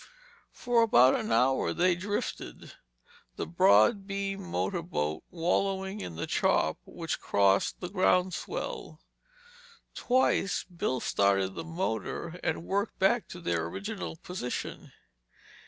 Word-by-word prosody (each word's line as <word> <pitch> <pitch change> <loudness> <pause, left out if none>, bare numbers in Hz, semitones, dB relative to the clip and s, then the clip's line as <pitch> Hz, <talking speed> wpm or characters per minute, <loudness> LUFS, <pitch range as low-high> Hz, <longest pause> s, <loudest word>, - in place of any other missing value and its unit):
For 245 -2 +1
about 230 +3 +6
an 230 -5 -2
hour 130 +1 +2
they 180 +1 +3
drifted, 205 +4 -4 0.6
the - - -3
broad 105 - +4
beamed 195 -1 -3
motor 180 0 -1
boat 80 - -2
wallowing 190 +3 -1
in 85 - -6
the 85 - -3
chop - - +1
which - - -4
crossed 100 -1 +2
the 180 - -3
ground 185 -1 +2
swell. - - -5 0.9
Twice 250 -5 +1
Bill 170 -8 -3
started 100 -1 +2
the 165 - -5
motor 165 - -3
and 160 -1 -1
worked 200 +1 -1
back 195 +1 +2
to 175 - -9
their 85 - -1
original 90 -2 -5
position. 125 - -5
180 Hz, 120 wpm, -29 LUFS, -, 0.9 s, about